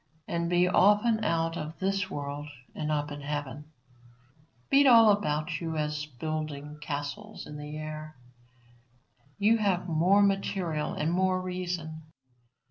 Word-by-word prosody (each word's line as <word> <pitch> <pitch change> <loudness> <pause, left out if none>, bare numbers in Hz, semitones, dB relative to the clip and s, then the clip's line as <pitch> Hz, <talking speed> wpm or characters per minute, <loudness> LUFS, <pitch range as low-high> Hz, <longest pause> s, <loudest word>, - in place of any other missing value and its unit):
And 170 0 -1
be 175 +1 +3
often 210 +4 +4
out 165 -2 0
of 155 -1 -6
this 195 +1 -1
world 145 +1 -5 0.3
and 155 0 -3
up 150 -1 -1
in 145 0 -6
heaven. 145 0 -4 1.1
Beat 275 0 +6
all 230 -4 +8
about 155 -8 -1
you 160 -1 -3
at 150 0 -1 0.2
building 150 0 -4
castles 150 +8 -5
in 150 - -9
the 150 +1 -7
air; 155 0 -7 1.2
you 220 +3 +3
have 190 -4 +1
more 180 +5 +4
material 190 -6 0
and 155 +2 0
more 185 +1 +2
reason. 180 -3 -4
165 Hz, 130 wpm, -29 LUFS, 150-195 Hz, 1.2 s, all